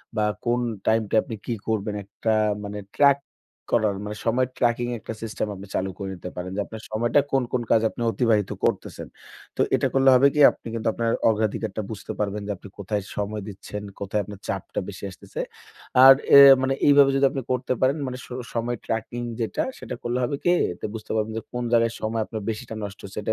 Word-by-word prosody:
বা 105 -1 +2 0.2
কোন 120 +1 +2 0.3
টাইমটা 110 -1 +2
আপনি 115 - -6
কি 120 - -2
করবেন 105 -1 -1
একটা 105 +3 -2 0.3
মানে 105 0 -5 0.2
ট্রাক 140 -1 +6 0.6
করার 110 -4 +3
মানে 105 0 -5
সময় 125 +2 +2
ট্র্যাকিং 120 0 +1
একটা 115 - -6
সিস্টেম 110 -1 -3
আপনি 100 +1 -10
চালু 95 - 0
করে 95 -1 -5
নিতে 90 0 -7
পারেন। 90 +1 -5
যে 105 - 0
আপনার 110 -1 -9
সময়টা 120 +6 +2
কোন, 135 -1 +2
কোন 125 - +1
কাজে 110 0 +4
আপনি - - -8
অতিবাহিত 110 -5 +1 0.2
করতেছেন। - - -2 0.5
তো - - +2
এটা - - +1
করলে 135 0 +5
হবে 130 +2 +6
কি? 150 - -1
আপনি - - -13
কিন্তু 115 -1 -3
আপনার 115 -1 0 0.2
অগ্রাধিকারটা 110 -1 -1
বুঝতে 105 - -6
পারবেন 105 0 -1
যে - - -1
আপনি 100 - -12
কোথায় 100 +1 -2
সময় 105 +1 -3
দিচ্ছেন, 105 +1 -7 0.2
কোথায় 100 +1 -1
আপনার 100 0 -10
চাপটা 95 - -3
বেশি 100 - -10
আসতেছে। - - -7 0.6
আর 135 - +12 0.2
এ - - +12 0.2
মানে 135 0 +1
এইভাবে 140 -1 +7
যদি 135 0 +4
আপনি 135 -2 -3
করতে 130 0 0
পারেন 130 +2 +3
মানে 125 0 -5
স - - -16 0.3
সময় 120 +1 -1
ট্র্যাকিং 115 +2 -3 0.2
যেটা 115 - -1
সেটা - - -6
করলে 120 +1 -1
হবে 130 +4 0
কি? 175 - +4 0.4
বুঝতে 110 - -7
পারবেন 110 0 0
যে - - -2
কোন 125 0 -2
জায়গায় 115 -1 +3
সময় 110 +1 -1
আপনার 110 0 -6
বেশিটা 110 +1 -5
নষ্ট 100 0 -7
হচ্ছে। 100 +1 -6
110 Hz, 200 wpm, -24 LUFS, 105-120 Hz, 0.6 s, আর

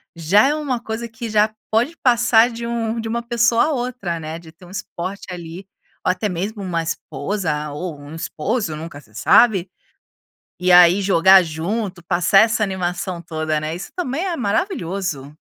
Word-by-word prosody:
já 190 - +4
é 300 - +1
uma 275 -6 -2
coisa 225 +1 -4
que 230 0 -7
já 215 0 +2 0.2
pode 240 +9 +1
passar 235 -1 +4
de 235 0 -6
um 230 -1 -2
de 225 - -4
uma 235 +1 -2
pessoa 235 -1 +2
a 315 - 0
outra, 245 - -3
né, 160 +1 -6
de 165 -2 -14
ter 165 +3 -18
um - - -14
esporte 195 -1 -6
ali 175 +1 -8 0.4
ou - - +3
até 210 +3 -2
mesmo 200 +3 -4
uma 170 -3 -2
esposa 160 -3 -3
ou 155 0 -5
um 145 +2 -10
esposo, 165 +3 -2
nunca 155 -1 -8
se 110 -6 -21
sabe. 190 - +4 0.9
E 185 - +1
aí 180 +2 +7
jogar 190 0 +6
junto 180 +4 -4
passar 180 +3 +4
essa 220 0 +2
animação 185 -2 -2
toda 155 -2 -2
né 155 +1 -3
isso 180 - -7
também 325 0 -2
é 345 -3 -2
maravilhoso. 190 - -2
195 Hz, 175 wpm, -20 LUFS, 170-230 Hz, 0.9 s, aí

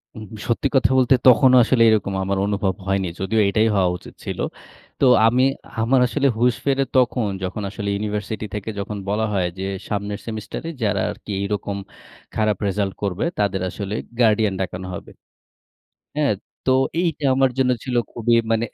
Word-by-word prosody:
উ - - -11 0.3
সত্যি 120 +4 +1
কথা 130 - +4
বলতে 130 0 +5
তখনো 130 +1 +7
আসলে 120 +1 +2
এরকম 105 -3 +1
আমার 95 +1 -1
অনুভব 100 -2 0
হয়নি 95 -1 0
যদিও 100 +4 0
এটাই 110 +2 +2
হওয়া 95 -2 +3
উচিত - - -14
ছিল। - - -4 0.6
তো - - +4 0.2
আমি, 125 +3 +3 0.4
আমার 125 +4 +3
আসলে 140 +3 +1
হুশ 120 -1 +3
ফিরে 135 -1 +2
তখন 125 -3 +2 0.2
যখন 95 +3 -3
আসলে 100 0 -4
ইউনিভার্সিটি 105 +1 -3
থেকে 105 +1 -4
যখন 100 +1 -4
বলা 110 +2 +1
হয় 95 -3 +1
যে, 95 - -2 0.2
সামনের 100 0 -3
সেমিস্টারে 110 +8 -5
যারা 100 -2 +1
আরকি 105 0 -9
এরকম 100 0 -3 0.6
খারাপ 110 -2 +1
রেসাল্ট 100 0 -1
করবে 100 - -1
তাদের 100 -2 0
আসলে 100 +3 -5 0.2
গার্ডিয়ান 110 -3 +3
ডাকানো 90 0 -4
হবে। - - -9 1.1
হ্যাঁ, 150 -4 +2 0.3
তো 130 - +4 0.3
এইটা 160 -4 -2
আমার 135 0 +3
জন্য 130 -1 +3
ছিল 125 -2 -2 0.2
খুবই 120 0 +1 0.2
মানে 115 0 +2
105 Hz, 165 wpm, -22 LUFS, 100-125 Hz, 1.1 s, তখনো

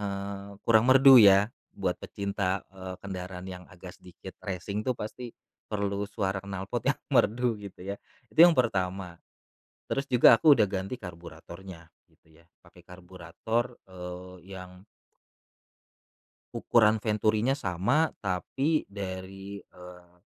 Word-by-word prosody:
eee, 100 0 -6
kurang 110 0 +4
merdu 135 0 +8
ya, 100 -2 +7 0.2
buat - - -2
pecinta, 100 -2 -3
eee, 95 -1 -8
kendaraan 90 -2 -7
yang 90 -1 -9
agak 90 0 -12
sedikit 90 +1 -13
racing 100 +2 -4
tuh 130 - +1
pasti, 115 +3 -7 0.3
perlu 100 -1 -2
suara 95 -1 -2
knalpot 95 -1 -5
yang - - +1
merdu 120 +1 +2
gitu 100 -3 -11
ya, 100 +1 -4 0.3
itu - - -23
yang 175 - +7
pertama. 95 - -1 0.7
Terus 135 - -1
juga 125 -2 +6
aku 150 +6 +6
udah 105 -3 +3
ganti 95 +6 -4
karburatornya, 85 0 -11 0.2
gitu - - -31
ya, 85 - -22 0.2
pakai - - -20
karburator, 90 +6 -4 0.2
eee, 90 0 -9 0.2
yang 90 0 -11 1.7
ukuran 110 -2 +3
venturinya 110 +3 +1
sama 135 - +1 0.2
tapi 135 - -1
dari, 95 0 -7
eee 90 -1 -16
100 Hz, 125 wpm, -28 LUFS, 90-110 Hz, 1.7 s, merdu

